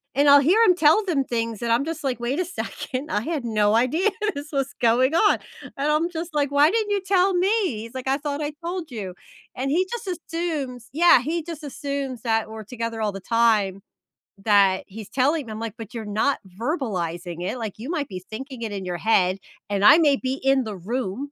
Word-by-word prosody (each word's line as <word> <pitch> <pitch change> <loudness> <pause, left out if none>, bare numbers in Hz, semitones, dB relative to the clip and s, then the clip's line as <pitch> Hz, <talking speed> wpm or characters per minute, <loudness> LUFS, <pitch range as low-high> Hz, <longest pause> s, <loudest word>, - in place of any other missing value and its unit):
and 285 +1 +4
I'll 285 0 +8
hear 370 +11 +4
him 360 -4 +5
tell 325 +6 +4
them 295 -7 +1
things, 230 -3 -3
and 235 -1 -1
I'm 245 +5 +2
just 320 -2 -5
like, 255 -4 -1
"Wait 245 +5 -2
a - - +2
second, 305 -5 -5
I 210 - +1
had 295 -2 -3
no 215 -1 +2
idea 310 - +2 0.3
this 290 +2 -7
was 275 -1 -1
going 255 +6 +3
on." 415 +4 +4 0.4
and 285 +2 0
I'm 320 +3 +1
just 330 -1 -6
like, 285 -1 0
"Why 290 +2 +5
didn't 430 0 0
you 405 - +2
tell 380 0 +2
me?" 365 +2 +2 0.3
he's 230 +2 -9
like, 260 +1 -3
"I 270 - +2
thought 290 0 -4
I 295 0 -2
told 345 -4 -4
you." 195 -6 -6 0.4
and 270 +2 -2
he 365 +4 +2
just 475 -4 -5
assumes 310 -9 -4
Yeah, 335 -5 +6
he 325 +5 -2
just 325 -2 -8
assumes 280 -3 -4
that 225 -2 0
we're 220 0 -8
together 230 -1 -4
all 210 -2 0
the 195 - -7
time 215 -4 +2 0.6
that 195 -2 +3
he's 210 +1 -9
telling 275 0 +1
'em, 215 +1 -6
like, 225 -2 -4
but 225 +1 -9
you're 225 -2 -5
not 220 +7 0 0.2
verbalizing 175 - -3
it, 255 - -3
like, 220 -4 -4
you 245 +6 -7
might 300 -5 -2
be 185 -2 -6
thinking 260 +2 -7
it 220 -2 -3
in 195 -2 -5
your 175 -1 -3
head, 190 -2 +2 0.3
and 200 0 0
I 300 +9 +9
may 290 -4 +4
be 260 0 -2
in 270 -1 +3
the 210 -3 -5
room, 235 +6 -3
260 Hz, 220 wpm, -24 LUFS, 220-310 Hz, 0.6 s, I